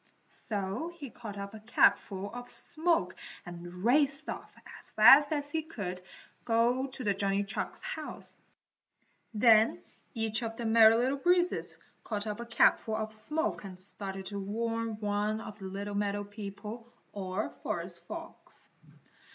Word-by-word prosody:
So 205 - -4
he 280 -7 -8
caught 210 -4 -8
up 200 +1 -6
a 220 - -8
capful 205 -3 +2
of 245 0 -7
smoke 330 +1 0 0.3
and 175 +1 -9
raced 280 +4 +3
off - - -6 0.3
as - - -7
fast 270 +7 +8
as 290 -1 -2
he 320 - 0
could 200 - -6 0.4
go 240 +3 +2
to 255 -6 -1
Johnny 200 0 0
Chuck's 200 +2 -2
house. - - -6 1.0
Then 220 0 +5 0.3
each 225 0 -1
of 225 -1 -4
the 235 - -4
Merry 225 0 +7
Little 260 +4 +1
Breezes 355 +3 +2 0.3
caught 210 -2 -3
up 210 0 -4
a 235 - -6
capful 230 -1 +3
of 215 0 -3
smoke 300 +9 0
and 185 -2 -8
started 195 0 0
to 200 +1 -4
warn 225 +2 -2
one 210 +1 0
of 220 -1 -9
the 195 - -8
little 200 +2 -5
meadow 205 0 -1
people 210 +3 -8 0.2
or 195 +1 -3
forest - - -4
folks. - - -9
220 Hz, 145 wpm, -31 LUFS, 200-245 Hz, 1.0 s, fast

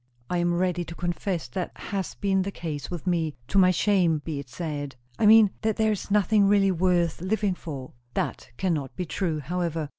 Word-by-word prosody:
"I 180 - +1
am 175 0 +1
ready 175 0 0
to 170 - -8
confess 175 -2 -2
that 180 +8 -4
has 195 -2 -4
been 195 -1 +1
the 190 - -2
case 155 -6 -5
with 175 -1 -6
me, 165 -4 0
to 195 - +3
my 185 -1 +6
shame 185 -4 +3
be 155 -3 -3
it 140 -2 -9
said." 145 -2 -5 0.2
"I 215 - +4
mean, 215 -2 +8
that 220 -1 +1
there 220 0 +2
is 210 - -4
nothing 205 0 +4
really 200 -1 +4
worth 175 -2 +1
living 200 +1 0
for." 140 -7 -7 0.2
"That - - -2
cannot 155 -8 -1
be 180 - -3
true, 160 -2 -2
however." 165 0 -2
180 Hz, 200 wpm, -26 LUFS, 160-195 Hz, 0.2 s, mean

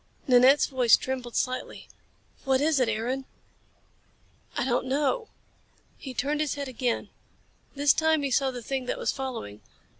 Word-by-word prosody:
Nanette's 260 +3 +6
voice 255 -4 +4
trembled 255 -2 -5
slightly. 255 0 -3 0.6
"What 265 -1 +2
is 295 0 +2
it, 250 -3 +2
Aaron?" 245 +5 -2 1.3
"I - - 0
don't 250 0 0
know." 295 - 0 0.7
He 260 -3 -9
turned 295 +4 -1
his 300 -2 -1
head 285 -1 -4
again. 245 -1 -2 0.7
This 285 0 +4
time 315 -2 +2
he 275 - -1
saw 270 +1 +2
the 245 -2 -7
thing 265 +1 -3
that - - -2
was - - 0
following. 235 - -6
265 Hz, 150 wpm, -27 LUFS, 250-280 Hz, 1.3 s, Nanette's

